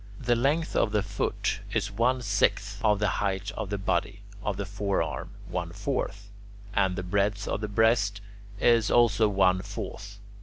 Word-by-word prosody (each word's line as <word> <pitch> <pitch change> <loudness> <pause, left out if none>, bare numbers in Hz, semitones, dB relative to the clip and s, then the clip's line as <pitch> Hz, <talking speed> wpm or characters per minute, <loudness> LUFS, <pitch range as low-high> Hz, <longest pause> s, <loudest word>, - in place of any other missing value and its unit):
The 120 -1 +2
length 145 +7 +1
of 105 - +2
the 105 -2 +2
foot 100 -1 -2
is 110 -1 0
one 125 +4 +1
sixth 105 - 0
of 105 -2 +4
the 105 +1 +1
height 100 +1 -1
of 105 -2 -5
the 100 - -1
body; 95 +1 -1 0.2
of 100 -2 -2
the 100 - -3
forearm, 100 0 -2 0.2
one - - -3
fourth; 100 0 -3 0.4
and 95 -2 +2
the 95 - -3
breadth 100 +2 0
of - - -2
the 105 - -2
breast 105 -1 +2 0.4
is 115 -2 +4
also 115 -3 +4
one 95 -2 +3
fourth. 100 +2 -7
100 Hz, 165 wpm, -28 LUFS, 100-110 Hz, 0.4 s, of